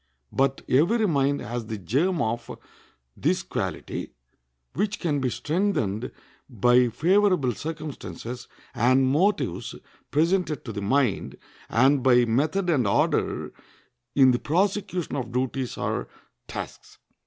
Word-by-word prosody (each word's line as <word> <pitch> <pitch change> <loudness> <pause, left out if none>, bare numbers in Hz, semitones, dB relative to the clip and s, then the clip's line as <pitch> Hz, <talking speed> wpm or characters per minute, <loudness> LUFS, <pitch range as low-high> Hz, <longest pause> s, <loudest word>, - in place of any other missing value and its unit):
But 135 0 0
every 210 - +3
mind 140 -3 +1
has 120 0 -5
the 110 -1 -4
germ 145 - 0
of 115 +1 -3 0.7
this - - 0
quality, - - -4 0.6
which 210 +2 -1
can 150 -5 0
be 130 -2 0
strengthened 145 - -1 0.4
by 120 +1 +4
favorable 175 - +2
circumstances 150 -5 -6 0.3
and 130 +3 +3
motives 145 - 0 0.3
presented 165 -1 +1
to 115 - -5
the 100 - -4
mind, 125 0 0 0.3
and 135 +4 +4
by 125 -1 +5
method 155 +11 0
and 140 -10 +2
order - - 0 0.6
in 130 -2 +6
the 120 - +1
prosecution 185 +1 -1
of 130 -3 -4
duties 130 0 -2
or - - -2 0.4
tasks. - - -8
135 Hz, 120 wpm, -25 LUFS, 120-170 Hz, 0.7 s, in